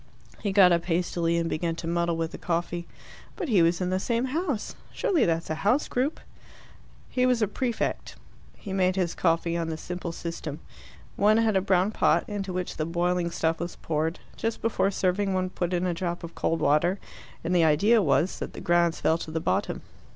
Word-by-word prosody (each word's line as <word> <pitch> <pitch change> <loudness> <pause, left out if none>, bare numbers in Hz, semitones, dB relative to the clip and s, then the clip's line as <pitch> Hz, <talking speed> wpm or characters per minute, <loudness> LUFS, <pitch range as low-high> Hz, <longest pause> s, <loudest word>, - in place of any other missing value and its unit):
He 205 - -1
got 190 -2 +7
up 170 -1 +2
hastily, 170 -1 0
and 165 0 0
began 165 +1 -1
to 165 - -7
muddle 170 0 0
with 165 0 -2
the - - -8
coffee. 170 0 -2 0.5
"But 360 -8 -4
he 200 -7 +5
was 170 +1 +3
in 180 0 0
the 185 - +1
same 235 +4 0
house. 305 - -2 0.2
Surely 405 -10 +1
that's 165 -1 -1
a 155 - -3
house 245 +9 +2
group?" 265 +5 -1 0.9
"He 255 0 +1
was 245 -3 +2
a - - +2
prefect." 235 +3 -2 0.4
He 195 - -7
made 185 -1 +2
his 180 -3 0
coffee 165 0 +1
on 165 -1 -1
the 160 - -3
simple 180 +1 -5
system. 165 -3 -6 0.6
One 210 +2 +4
had 225 -2 +2
a 190 - +4
brown 190 +1 +2
pot, - - +2
into 200 -2 -4
which 180 0 -4
the 155 - -1
boiling 175 +1 0
stuff 165 -1 0
was 175 0 -4
poured. 160 +2 -2 0.2
Just 225 0 -2
before 220 -3 +2
serving 195 0 0
one 185 0 -1
put 175 -1 -2
in 180 0 0
a 180 - 0
drop 175 0 -3
of 170 0 -7
cold 165 - -1
water, 160 +6 +3 0.5
and 175 +2 0
the 170 - +5
idea 200 +9 +4
was 170 +1 +1
that - - -5
the - - -7
grounds 170 -1 +2
fell 160 +1 +2
to 160 - -6
the 160 +1 -2
bottom. - - -1
175 Hz, 205 wpm, -27 LUFS, 165-200 Hz, 0.9 s, got